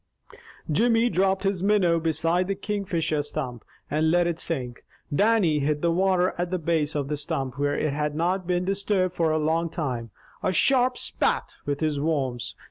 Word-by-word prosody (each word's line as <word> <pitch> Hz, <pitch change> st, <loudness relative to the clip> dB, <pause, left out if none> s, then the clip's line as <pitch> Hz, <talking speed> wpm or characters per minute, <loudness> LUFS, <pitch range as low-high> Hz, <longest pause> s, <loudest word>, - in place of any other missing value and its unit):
Jimmy 230 Hz, +7 st, +3 dB
dropped 190 Hz, -1 st, +1 dB
his 195 Hz, -2 st, 0 dB
minnow 190 Hz, -4 st, +3 dB
beside 165 Hz, +3 st, +1 dB
the 195 Hz, -, -1 dB
Kingfisher 185 Hz, -7 st, -1 dB
stump, 135 Hz, -6 st, -5 dB, 0.2 s
and 155 Hz, +2 st, +1 dB
let 175 Hz, +1 st, +3 dB
it 170 Hz, -1 st, -2 dB
sink. 125 Hz, -7 st, -3 dB, 0.3 s
Dannie 200 Hz, -4 st, +3 dB
hit 150 Hz, +2 st, -1 dB
the 170 Hz, -, +3 dB
water 185 Hz, +1 st, +2 dB
at 175 Hz, 0 st, -1 dB
the 185 Hz, -, -1 dB
base 160 Hz, -3 st, 0 dB
of 145 Hz, -2 st, -1 dB
the 150 Hz, -, -1 dB
stump, 145 Hz, -3 st, -3 dB
where 145 Hz, 0 st, +1 dB
it 155 Hz, -2 st, 0 dB
had 150 Hz, 0 st, -2 dB
not 180 Hz, +3 st, 0 dB
been 180 Hz, 0 st, 0 dB
disturbed 195 Hz, -1 st, 0 dB
for 165 Hz, -3 st, +1 dB
a 155 Hz, -, +1 dB
long 160 Hz, +2 st, 0 dB
time, 125 Hz, -8 st, -3 dB, 0.3 s
a -, -, +1 dB
sharp 250 Hz, +6 st, +3 dB
"Spat," -, -, -1 dB
with 145 Hz, +1 st, -2 dB
his 155 Hz, -2 st, 0 dB
worms. 140 Hz, -6 st, -1 dB
165 Hz, 180 wpm, -25 LUFS, 150-185 Hz, 0.3 s, Jimmy